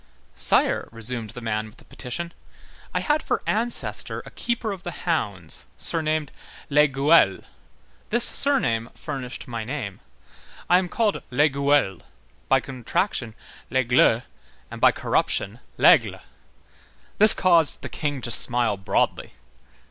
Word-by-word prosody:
"Sire," - - +1
resumed 115 0 -3
the 125 - -9
man 110 -1 -2
with 110 - -17
the - - -17
petition, 170 +7 -6 0.6
"I - - -1
had 300 +1 +1
for - - -2
ancestor 235 +2 0
a - - -12
keeper 235 -2 -2
of 195 -3 -7
the 175 - -6 0.2
hounds 100 - -1
surnamed 155 -2 -1 0.4
Lesgueules. 140 - +3 0.7
This 235 +2 +4
surname 120 - +3
furnished 125 -2 -7
my 115 -2 -5
name. 115 -5 -6 0.7
I 180 - +5
am 185 -1 -4
called 215 +1 0
Lesgueules, 140 - +1 0.5
by 135 - +4
contraction 125 - -3 0.3
Lesgle, 125 -2 +3 0.5
and - - -9
by - - +6
corruption 105 +5 -1 0.2
l'Aigle." - - +4 1.0
This 215 0 +7
caused 170 -5 +3
the - - -3
King 145 -3 -3
to 120 - -3
smile 120 -1 +3
broadly. 95 - -1
135 Hz, 125 wpm, -23 LUFS, 115-170 Hz, 1.0 s, This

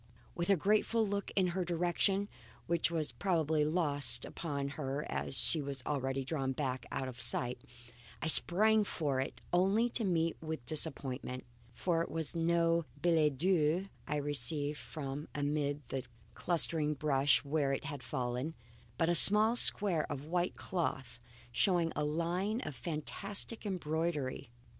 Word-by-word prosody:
With 170 +1 -3
a 200 - +5
grateful 215 +5 +1
look 200 0 -3
in 185 -2 +2
her 185 +1 -2
direction 175 +3 0 0.4
(which 170 -1 +1
was 160 -3 -2
probably 160 -5 0
lost 145 -6 +3
upon 140 -4 -4
her 140 0 -4
as 135 - -3
she 160 - +1
had 140 -2 -3
already 135 -2 -2
drawn 135 -2 -2
back 130 -3 -4
out 130 - -3
of 125 -2 -9
sight), 120 +1 +5 0.6
I 165 - -3
sprang 210 +7 +5
for 145 -9 -2
it 135 - -6
only 195 +7 +2
to 230 - +2
meet 165 -4 -1
with 160 -6 -6
disappointment. 130 -3 -1 0.3
For 170 -3 0
it 170 - -4
was 160 0 -3
no 170 0 +1
billet 155 -3 +2
doux 175 +2 +1 0.2
I 150 - -2
received 145 +1 -2
from 145 -1 -7
amid 145 -1 -2
the 135 -1 -4 0.3
clustering 160 -3 +2
brush 140 -1 +2
where 140 -1 0
it 135 - -3
had 145 -2 -6
fallen; 125 +4 -4 0.4
but 165 - +1
a 175 - +2
small 210 +6 +8
square 195 -10 +3
of 145 0 -5
white 175 +2 -1
cloth 135 -9 -4 0.3
showing 170 +3 +1
a 150 - -1
line 170 +8 -2
of 150 - -6
fantastic 195 - -5
embroidery. 160 - -3
155 Hz, 150 wpm, -33 LUFS, 140-175 Hz, 0.6 s, small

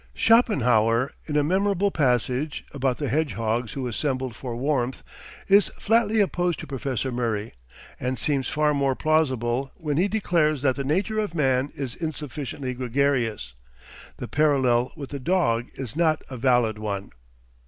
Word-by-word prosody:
Schopenhauer 125 - +3 0.2
in 150 -1 0
a 150 - +3
memorable 195 +4 +1
passage 130 +1 0
(about 135 -3 0
the 145 - -2
hedgehogs 120 -6 -1
who 135 -2 -4
assembled 130 0 -2
for 125 -3 -6
warmth) 130 -1 -1 0.4
is 200 +1 +5
flatly 225 0 +2
opposed 180 -4 +1
to - - -6
Professor 135 -1 -3
Murray, 115 -3 -2 0.5
and 125 +1 -2
seems 140 -1 0
far 150 0 +2
more 140 -2 +1
plausible 135 -5 +1
when 150 -4 -3
he 185 +4 +3
declares 165 -8 +1
that 130 -3 +3
the 140 - -3
nature 195 +10 0
of 205 -6 -2
man 135 -2 +1
is 135 -4 -4
insufficiently 145 -4 -4
gregarious. 125 - -1 0.6
The - - -6
parallel 130 -5 +2
with 140 -4 -8
the 140 - -4
dog 130 -7 +1
is 130 -5 -6
not 160 -2 +2
a - - -5
valid 120 -3 +2
one. 100 -2 -4
135 Hz, 150 wpm, -25 LUFS, 125-155 Hz, 0.6 s, is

